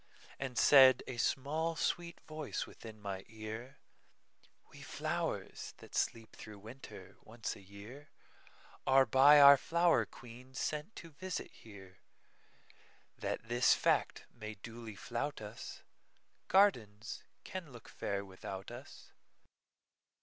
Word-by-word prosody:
And 130 -2 -4
said 130 -3 +8
a 130 - -6
small, 155 +7 0
sweet 170 0 -2
voice 155 -2 -4
within 110 -2 -12
my 100 -2 -5
ear:"We 110 +3 -12
flowers, - - -3
that - - -15
sleep 115 -1 -2
through 105 -1 -10
winter, 110 +7 -11
once 115 0 -5
a - - -13
yearAre 125 +4 -3
by 145 +3 +8
our 140 0 +10
flower 170 +5 +2
queen 125 +2 -13
sent 150 +10 -3
to 165 - -10
visit 185 +5 -5
here, 95 -4 -14 1.2
That - - -3
this 120 +1 +4
fact - - +1
may 110 -2 -7
duly 115 +1 -9
flout 145 +9 -3
us,—Gardens 110 - -2 0.2
can 180 -6 -7
look 120 -2 -12
fair 100 0 -3
without 95 +2 -8
us. 125 +4 -11
120 Hz, 110 wpm, -34 LUFS, 110-145 Hz, 1.2 s, our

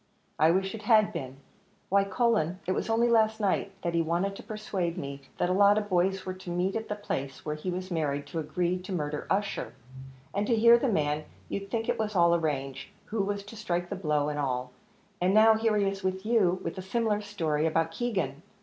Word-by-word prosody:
"I 155 +2 +6
wish 190 +3 +1
it 225 - -6
had 215 -1 +4
been. 135 -6 -5 0.5
Why, 195 +1 +4
Cullen, 195 -5 +1
it 185 - -1
was 190 - -1
only 230 +2 +3
last 220 -1 +3
night 200 -1 0
that 170 - -1
he 170 - +3
wanted 175 +5 0
to - - -9
persuade 195 -6 -3
me 140 -3 -5 0.2
that - - +1
a 180 - +1
lot 200 +2 +5
of 205 -1 -2
boys 190 +1 +1
were 185 - -3
to 185 -1 -10
meet 180 +2 0
at 225 0 -3
the 210 - -1
place 140 -9 -5
where 150 - -1
he 150 +5 -5
was 185 +1 -4
married, 145 -4 -1
to 155 +4 -4
agree 175 +3 -1
to 185 +2 -9
murder 150 -4 -3
Ussher; 200 +1 -1 0.6
and 205 +1 0
to 235 - +3
hear 235 +2 +7
the 260 - +1
man, 150 -5 0 0.2
you'd 200 0 -4
think 225 +1 -2
it - - 0
was 215 -1 -2
all 170 -1 +5
arranged, 145 -5 -2 0.2
who 220 -1 -2
was 200 0 -2
to 205 +3 -11
strike 175 -5 -2
the - - -1
blow 150 -6 0
and 150 0 -3
all; 125 -2 -2 0.5
and 185 +3 +3
now 220 +1 +7
here 220 -1 +1
he 200 - +2
is 195 0 -2
with 190 +1 -2
you, 200 -6 +3
with 165 +3 -4
a - - -3
similar 210 +2 0
story 160 -7 -1
about 165 0 +1
Keegan! 180 - -2
185 Hz, 225 wpm, -28 LUFS, 160-210 Hz, 0.6 s, hear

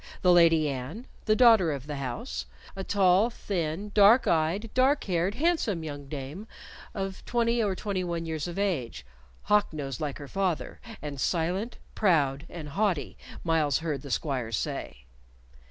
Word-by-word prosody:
The 180 - +6
Lady 165 -3 +5
Anne, 140 - -5 0.2
the 215 - +3
daughter 225 -8 +6
of 140 -2 -5
the 145 -1 -5
house; 120 - -4 0.3
a 195 - -4
tall, 195 +3 +3
thin, 195 -3 -3
dark 210 +5 +6
eyed, 170 +7 +1
dark 265 +3 +3
haired, 180 +1 0
handsome 270 - +1
young 145 -2 -7
dame 150 +9 -6 0.5
of 195 -1 -4
twenty 235 0 +1
or 200 -3 0
twenty 195 -1 -2
one 170 -1 -3
years 160 0 -3
of 175 - -6
age, 135 - -2 0.4
hawk 210 0 +3
nosed 140 -4 -5
like 145 -3 -3
her 145 - -9
father, 185 -1 -2 0.2
and 140 -3 -5
silent, 185 +7 -1 0.2
proud, 150 -6 +2
and 160 -4 -7
haughty, 190 -2 -1 0.3
Myles 160 -4 +2
heard 155 -5 -3
the 140 - -9
squires 125 -6 -1
say. - - -5
170 Hz, 155 wpm, -28 LUFS, 145-205 Hz, 0.5 s, The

